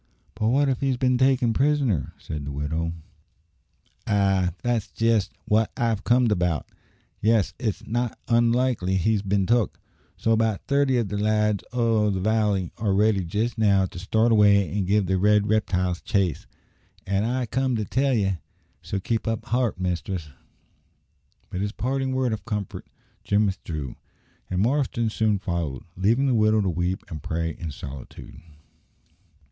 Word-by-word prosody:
"But 110 0 -1
what 140 +5 +3
if 130 -2 -1
he's 135 -2 +1
been 125 -1 +2
taken 130 -3 +3
prisoner?" 135 - +1
said 75 -2 -6
the 70 - -5
widow. 80 +4 -2 1.1
"Ay, 95 -3 +2
that's 120 -4 0
jest 115 -4 +1 0.2
wot 110 +1 +3
I've 115 -5 0
comed 120 -1 +3
about. 90 -5 0 0.5
Ye 110 +1 +4
see - - -11
it's 110 -4 -3
not 120 +1 -2
onlikely 115 -5 +2
he's 105 +3 +1
bin 100 -1 +1
took; 120 0 +1 0.4
so 115 - 0
about 110 -2 +1
thirty 140 -2 +2
o' 120 - +2
the 100 -1 -4
lads 105 -1 +1
o' 115 -3 +2
the 95 -2 -1
valley 105 -3 +1
are 105 -3 +1
ready 105 -1 +3
jest 110 +7 -2
now 100 -3 +4
to 90 - -8
start 110 +5 +2
away 100 -3 +4
and 100 -3 -1
give 100 0 +2
the 95 +1 0
red 105 +1 +4
riptiles 90 -5 0
chase, 95 -8 -1 0.6
an' 100 +1 0
I 125 +2 0
come 130 +2 0
to 110 -2 -1
tell 135 +4 +1
ye; 95 -5 0 0.4
so 100 - -3
keep 115 +4 -2
up 115 -1 -2
heart, 120 -5 0
mistress." 90 -2 -3 1.2
With 90 - -3
this 105 0 -1
parting 135 +3 -2
word 130 -3 0
of 110 - -5
comfort, 105 -4 -5 0.4
Jim 105 +1 +2
withdrew, 80 -8 -4 0.5
and 95 +1 0
Marston 120 -3 0
soon 110 -1 +1
followed, 85 -8 -3
leaving 115 +9 +2
the 135 - +2
widow 110 -1 +3
to 95 - 0
weep 90 +3 -2
and 80 -7 -7
pray 80 +2 -2
in 80 +1 -6
solitude. 70 -1 -9
105 Hz, 160 wpm, -25 LUFS, 95-120 Hz, 1.2 s, Ye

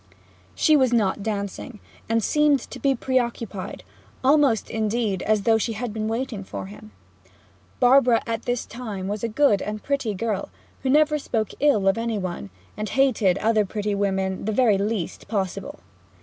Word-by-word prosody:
She 310 - +4
was 260 -4 +3
not 210 -4 +1
dancing, 205 +2 -4 0.3
and 225 -1 +1
seemed 300 +3 +3
to - - -7
be 275 -1 +2
preoccupied 235 -6 -2 0.4
almost, 275 -5 +3
indeed, 215 -3 -1
as 215 -2 +1
though 225 0 +4
she 225 +1 -1
had 225 0 -4
been 215 0 -2
waiting 225 -2 -3
for 100 - -6
him. 105 +2 -12 0.9
Barbara 250 -2 +5
at 230 -1 -3
this 245 -1 -1
time 215 -6 -6
was 205 +2 -4
a - - +1
good 225 -2 +3
and 210 0 -5
pretty 275 -7 -1
girl, 210 0 -2 0.3
who 265 - -1
never 300 +2 +4
spoke 220 -6 -2
ill 230 -10 +3
of 195 +4 +3
any 230 -1 -1
one, 175 - -5 0.3
and 215 -1 -4
hated 225 -8 +2
other 215 0 +2
pretty 210 +1 -3
women 190 -1 -1
the 220 - 0
very 215 -3 +3
least 205 -3 -3
possible. 200 +6 -3
220 Hz, 165 wpm, -24 LUFS, 200-250 Hz, 0.9 s, Barbara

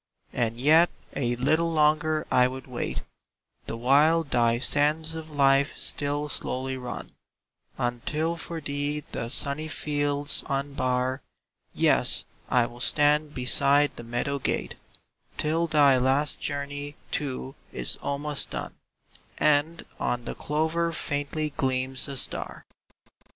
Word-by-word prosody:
And 115 -1 -1
yet 160 +6 +6 0.3
a 120 -3 0
little 155 +7 +1
longer 155 0 +2
I 125 0 +5
would 130 +1 -7
wait, 125 -2 -4 0.6
The 115 - -4
while 145 +7 +4
thy 120 -5 +2
sands 150 +5 +2
of 160 -1 -7
life 140 -1 +3
still 145 +1 -2
slowly 130 -2 -2
run, 125 -1 -6 0.7
Until 145 +7 -1
for 165 0 -6
thee 145 0 -2
the 115 - -4
sunny 140 +4 -1
fields 145 -1 0
unbar; 130 -1 -1 0.5
Yes, - - +3 0.3
I 125 -1 +4
will 120 +1 -10
stand 150 +3 +2
beside 140 +3 +3
the - - -8
meadow 120 +4 -2
gate - - -1 0.6
Till 165 +2 +1
thy 145 -4 +5
last 135 +3 +3
journey, 145 0 -4 0.2
too, 135 -2 -3 0.2
is - - 0
almost 145 +1 -1
done - - -5 0.6
And 150 +3 +2
on 120 -1 -1
the - - -4
clover 160 +3 0
faintly 150 0 -2
gleams 130 -1 -1
a 140 -1 -5
star. - - -2
145 Hz, 125 wpm, -27 LUFS, 130-150 Hz, 0.7 s, yet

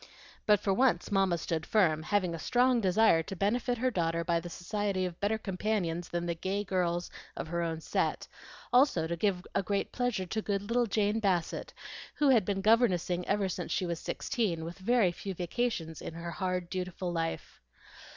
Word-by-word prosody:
But 210 -1 +6
for 195 -1 +1
once 255 +1 +2
Mamma 195 -3 +3
stood 160 0 -2
firm, 160 -6 +2
having 180 +1 0
a 165 - -5
strong 245 +5 +3
desire 190 -3 +4
to 180 +4 -7
benefit 240 +6 0
her 255 +2 +1
daughter 170 -4 0
by 170 0 +1
the 175 +1 -7
society 195 +2 -2
of 175 -2 -6
better 210 +2 +1
companions 185 -4 -2
than 175 0 -2
the 170 - 0
gay 190 +4 -2
girls 175 -3 -1 0.3
of - - -5
her 170 0 -1
own 165 -1 -2
set, - - -1 0.5
also 250 - +4
to 170 +1 -2
give 180 0 0
a - - +2
great 200 +1 -1
pleasure 245 -6 -1
to 220 +5 -2
good 200 -2 -1
little 235 +3 +1
Jane 210 +1 +1
Bassett, 185 -6 -1 0.4
who 295 -2 +3
had 230 -7 +5
been 195 -1 -1
governessing 185 -5 +2
ever 200 -1 +1
since 185 - -4
she 185 - 0
was 170 -2 -3
sixteen, 175 -9 -2
with 170 +3 -8
very 215 -2 +3
few 190 +2 -6
vacations 175 -2 -2
in 165 - -7
her 170 0 -5
hard, 180 +1 -2
dutiful 180 -1 -3
life. 165 -1 -4
185 Hz, 190 wpm, -31 LUFS, 170-215 Hz, 0.5 s, But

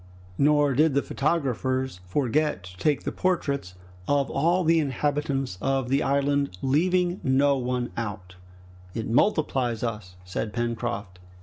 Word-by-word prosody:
Nor 145 -1 +4
did 150 +2 +3
the 140 - +2
photographers 130 - -1
forget 140 0 0
to 90 -1 -12
take 145 +8 +1
the - - -2
portraits 140 - -1 0.3
of 140 -1 +1
all 170 +6 +2
the 165 0 +4
inhabitants 140 - -1
of 135 -2 0
the 135 +2 +2
island, 140 -5 +1
leaving 175 +6 +2
out 180 - -8
no 140 +2 +3
one. 125 -1 -2 1.0
"It 115 -1 -3
multiplies 125 - +1
us," 105 -6 -4
said 105 +4 -4
Pencroft. 115 -5 -3
135 Hz, 130 wpm, -26 LUFS, 120-150 Hz, 1.0 s, Nor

